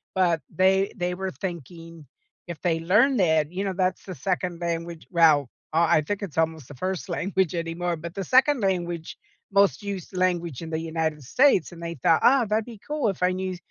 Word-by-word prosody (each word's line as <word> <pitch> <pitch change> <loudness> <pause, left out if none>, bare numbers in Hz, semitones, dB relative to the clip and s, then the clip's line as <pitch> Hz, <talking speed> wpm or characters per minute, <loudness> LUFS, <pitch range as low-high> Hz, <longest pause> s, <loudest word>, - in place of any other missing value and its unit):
But 175 -4 +2
they 190 +1 +2
they 180 -3 -2
were 190 +1 -3
thinking 165 -3 -8 0.4
if 170 -3 -7
they 165 -3 +1
learn 210 +11 +3
that, 160 -5 +2
you 190 +2 -3
know, 195 -1 -2
that's 185 0 -1
the 185 - -7
second 180 -1 -2
language 170 -1 -4
well, 155 -6 +4 0.3
I 165 -2 +4
think 205 +6 -3
it's 180 -7 -7
almost 160 -4 -1
the - - -9
first 185 +6 -4
language 190 0 0
anymore, 170 0 -2
but 170 +2 -8
the 195 - -3
second 260 - +4
language, 175 -4 -2 0.3
most 200 +1 +3
used 195 -2 -6
language 175 -6 0
in 165 - -6
the 160 -1 -2
United 160 -2 -2
States, 220 - +3
and 170 0 -10
they 170 0 -4
thought, 165 +3 +3
"Oh, 260 -1 +5
that'd 215 +1 0
be 230 0 -11
cool 295 -6 0
if 195 - -5
I 180 0 +3
knew 185 0 -3
175 Hz, 195 wpm, -25 LUFS, 165-190 Hz, 0.4 s, Oh